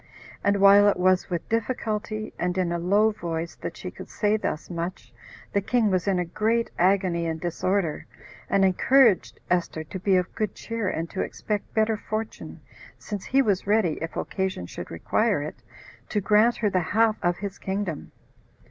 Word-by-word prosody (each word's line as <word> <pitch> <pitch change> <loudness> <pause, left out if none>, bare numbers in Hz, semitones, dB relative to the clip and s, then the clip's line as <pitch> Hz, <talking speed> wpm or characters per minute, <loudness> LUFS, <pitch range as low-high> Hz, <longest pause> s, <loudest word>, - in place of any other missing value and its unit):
And 200 0 +3
while 200 +1 +7
it 200 - 0
was 185 0 +2
with 170 -3 -3
difficulty, 215 -2 -2
and 180 +1 -1
in 180 -2 +1
a 170 - -1
low 205 +5 +3
voice, 170 -4 -4
that - - -6
she - - -6
could - - -11
say 210 0 +1
thus 160 -7 -3
much, 170 -8 -5 0.4
the 200 - +2
king 220 0 +2
was 185 0 0
in 195 -2 +2
a 180 - 0
great 225 +6 0
agony 180 -2 +2
and 160 0 -3
disorder, 175 0 -1 0.4
and 195 -1 +4
encouraged 225 +3 +4
Esther 175 -3 0
to 185 +5 -7
be 190 +1 +2
of 180 -1 0
good 215 -2 -2
cheer, 230 -4 -3
and 165 -1 -3
to - - -2
expect 210 -2 -3
better 220 0 +2
fortune, 215 +1 -5 0.4
since 205 -3 -6
he 270 +1 +3
was 200 -4 0
ready, 205 -6 +2
if 165 - -5
occasion 190 - -2
should - - -8
require - - 0
it, - - -8 0.5
to 210 - 0
grant 215 +4 +4
her 210 - +1
the 185 - +2
half 215 +5 +2
of 175 0 +1
his 200 0 -6
kingdom. 190 -5 -3
195 Hz, 180 wpm, -25 LUFS, 175-215 Hz, 0.5 s, while